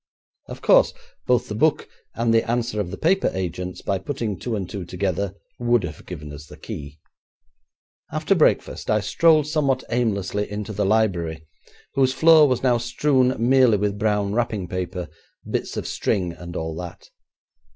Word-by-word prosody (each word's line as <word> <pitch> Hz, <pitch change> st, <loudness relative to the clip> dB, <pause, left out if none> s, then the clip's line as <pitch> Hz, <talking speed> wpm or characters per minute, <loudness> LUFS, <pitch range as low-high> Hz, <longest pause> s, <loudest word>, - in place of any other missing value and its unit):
Of -, -, -9 dB
course, -, -, +5 dB, 0.3 s
both -, -, +2 dB
the -, -, -5 dB
book -, -, +1 dB, 0.3 s
and 115 Hz, -1 st, +1 dB
the 115 Hz, 0 st, +2 dB
answer 120 Hz, -2 st, -1 dB
of 90 Hz, -, -4 dB
the 100 Hz, -, -6 dB
paper 190 Hz, +4 st, +2 dB
agents, 90 Hz, 0 st, -4 dB
by 95 Hz, -, -1 dB
putting 115 Hz, -1 st, -3 dB
two 120 Hz, -3 st, -3 dB
and 95 Hz, -4 st, -3 dB
two 100 Hz, 0 st, -6 dB
together, 95 Hz, +2 st, -2 dB, 0.2 s
would 120 Hz, -3 st, +2 dB
have 80 Hz, -3 st, -7 dB
given 75 Hz, -4 st, -7 dB
us 75 Hz, +1 st, -10 dB
the -, -, -13 dB
key. 70 Hz, +1 st, -8 dB, 1.1 s
After -, -, +1 dB
breakfast, -, -, +1 dB
I 105 Hz, -, +3 dB
strolled 155 Hz, +5 st, +4 dB
somewhat 145 Hz, -4 st, 0 dB
aimlessly 105 Hz, -4 st, -1 dB
into 105 Hz, +1 st, -4 dB
the 100 Hz, -1 st, 0 dB
library, 85 Hz, -7 st, 0 dB, 0.5 s
whose 130 Hz, -1 st, +2 dB
floor 155 Hz, +2 st, +6 dB
was 130 Hz, -2 st, 0 dB
now 125 Hz, -2 st, +3 dB
strewn 130 Hz, +2 st, +2 dB
merely 130 Hz, -4 st, +5 dB
with 100 Hz, 0 st, -1 dB
brown 105 Hz, -2 st, +1 dB
wrapping 110 Hz, -5 st, -1 dB
paper, 90 Hz, -1 st, -4 dB, 0.4 s
bits -, -, -3 dB
of -, -, -3 dB
string, 90 Hz, -3 st, -1 dB
and 85 Hz, 0 st, -9 dB
all 80 Hz, -1 st, -3 dB
that. 90 Hz, -1 st, -9 dB
105 Hz, 165 wpm, -23 LUFS, 90-125 Hz, 1.1 s, floor